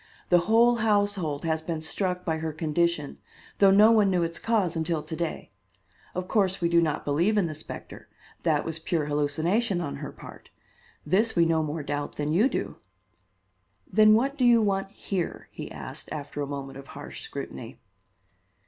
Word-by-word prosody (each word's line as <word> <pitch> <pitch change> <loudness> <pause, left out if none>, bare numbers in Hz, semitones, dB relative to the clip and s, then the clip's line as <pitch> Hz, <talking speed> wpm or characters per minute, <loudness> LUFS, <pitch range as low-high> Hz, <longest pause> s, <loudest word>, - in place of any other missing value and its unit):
The 175 - +6
whole 235 +2 +5
household 205 -9 0
has 160 -1 0
been 160 0 -3
struck 180 +3 -2
by 160 -2 -1
her 160 0 -3
condition, 160 -1 -1 0.4
though 195 - +7
no 210 +3 +7
one 215 -3 +4
knew 180 -2 +2
its 165 0 -4
cause 210 -7 +1
until 160 -1 -1
to 160 - -6
day. 170 -1 -4 0.6
Of 180 0 -3
course, 195 -2 +1
we 170 - +1
do 170 0 +4
not 155 -3 -1
believe 170 +9 +2
in 200 - +3
the 160 - -3
specter; 155 - -9 0.3
that - - +1
was 165 0 -4
pure 160 -1 -1
hallucination 160 +8 0
on 155 -5 -4
her - - -6
part. - - -13 0.6
This 210 +8 +2
we 170 -1 +5
no 165 -1 +2
more 155 0 -3
doubt 145 0 -3
than 150 +1 -1
you 215 +10 +4
do." - - -3 1.2
"Then 215 0 +7
what 275 +5 0
do - - +2
you 240 -1 +6
want 195 -2 0
here?" 195 -3 -4
he - - -8
asked, - - -9
after 145 -1 -5
a 140 - -2
moment 135 -1 -6
of 135 - -12
harsh - - -9
scrutiny. - - -7
170 Hz, 180 wpm, -27 LUFS, 155-205 Hz, 1.2 s, though